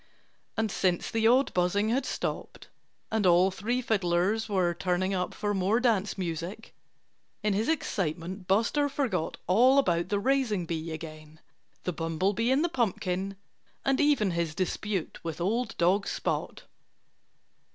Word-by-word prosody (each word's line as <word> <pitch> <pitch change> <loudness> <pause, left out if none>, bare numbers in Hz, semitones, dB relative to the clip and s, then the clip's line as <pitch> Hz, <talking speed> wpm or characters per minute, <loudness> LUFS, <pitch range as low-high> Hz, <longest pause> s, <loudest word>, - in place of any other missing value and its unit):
And 220 -2 0
since 180 -3 0
the 225 0 +2
odd 255 +4 +4
buzzing 185 +4 +1
had 255 +3 0
stopped, - - -4 0.4
and 220 -3 +2
all 180 +2 +5
three 240 +7 -2
fiddlers 200 +1 +1
were 185 -4 +1
tuning 185 +2 -1
up 180 -1 -1
for 205 -1 -1
more 195 +4 +2
dance 215 -6 +1
music, 175 +4 -5 0.7
in 210 -1 +2
his 215 +6 0
excitement 185 - -2
Buster 230 +9 +2
forgot 240 - -1
all 245 +9 +5
about 175 -9 +2
the 205 - +1
raising 225 -5 +1
bee 165 0 -4
again, 155 -1 -9 0.4
the 180 - -2
bumblebee 185 +8 0
in 270 +4 +3
the - - +3
pumpkin, 195 - -1 0.5
and 270 +1 +2
even 285 -10 +3
his 170 -2 -2
dispute 190 0 -2
with 165 -1 -5
old 225 +6 -1
dog 190 +4 +2
Spot. - - -3
195 Hz, 140 wpm, -28 LUFS, 175-225 Hz, 0.7 s, all